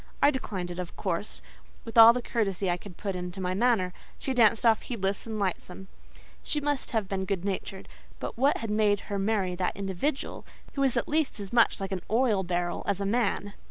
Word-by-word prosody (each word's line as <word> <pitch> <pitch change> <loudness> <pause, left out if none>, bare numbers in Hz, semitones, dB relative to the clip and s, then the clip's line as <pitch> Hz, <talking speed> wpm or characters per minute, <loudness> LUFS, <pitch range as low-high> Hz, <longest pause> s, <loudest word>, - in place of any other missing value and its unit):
I 290 - +5
declined 190 -10 -4
it 175 - -6
of 180 -1 -5
course, 190 +2 -3 0.4
with 225 - -8
all 225 0 +11
the 245 +1 -3
courtesy 195 -5 0
I 175 - 0
could 180 -1 -12
put 195 -2 -3
into 180 +1 -5
my 185 -1 -1
manner; 195 -4 +2 0.2
she 265 - -3
danced 230 -1 +4
off 225 -2 +5
heedless 200 -3 -3
and 220 -1 -4
lightsome. 190 -1 -3 0.5
She 300 - -1
must 290 -2 -1
have 220 -4 -1
been 190 0 -2
good 190 -1 -2
natured; 195 -1 -4 0.3
but - - -5
what 270 +4 +3
had 225 -2 -4
made 210 -1 +3
her 200 - 0
marry 195 -2 0
that 180 +1 -2
individual, 200 - -2 0.3
who 275 - -2
was 265 -3 +2
at 235 - 0
least 305 -6 0
as 200 +1 -7
much 235 -1 +4
like 195 -1 -4
an 190 -2 -2
oil 225 -3 +2
barrel 175 -1 -2
as 200 -1 +1
a 200 - -1
man? 205 -2 0
200 Hz, 210 wpm, -28 LUFS, 190-235 Hz, 0.5 s, all